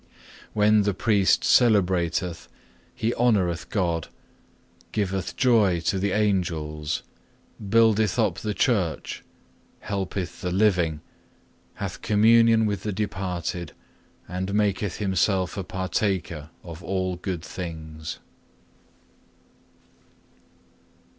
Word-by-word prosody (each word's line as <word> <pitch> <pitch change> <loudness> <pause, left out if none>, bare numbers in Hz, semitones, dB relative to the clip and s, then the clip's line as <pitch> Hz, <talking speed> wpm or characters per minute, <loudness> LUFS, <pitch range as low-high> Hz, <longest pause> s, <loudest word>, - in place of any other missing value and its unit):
When 105 0 +4
the 100 -2 0
priest 100 -2 +3
celebrateth, 90 -6 +2 0.5
he 115 +2 0
honoureth 100 -8 +1
God, 85 -5 -1 0.8
giveth 95 -3 -2
joy 110 -9 +4
to 95 +3 0
the 100 +1 0
Angels, 80 -7 -1 0.7
buildeth 110 -2 +4
up - - +1
the 105 -1 -3
Church, 95 - 0 0.6
helpeth 95 -2 -4
the 90 - -2
living, 90 -5 +2 0.7
hath - - -5
communion 115 +1 +5
with 105 -2 -1
the 105 - -3
departed, 90 -4 -3 0.5
and 95 +2 -3
maketh 105 -2 0
himself 95 -2 +1
a 100 - -3
partaker 95 -4 -2
of 85 -1 -9
all 95 +1 -1
good 90 -2 -4
things. 80 -3 -7
95 Hz, 95 wpm, -25 LUFS, 85-105 Hz, 0.8 s, communion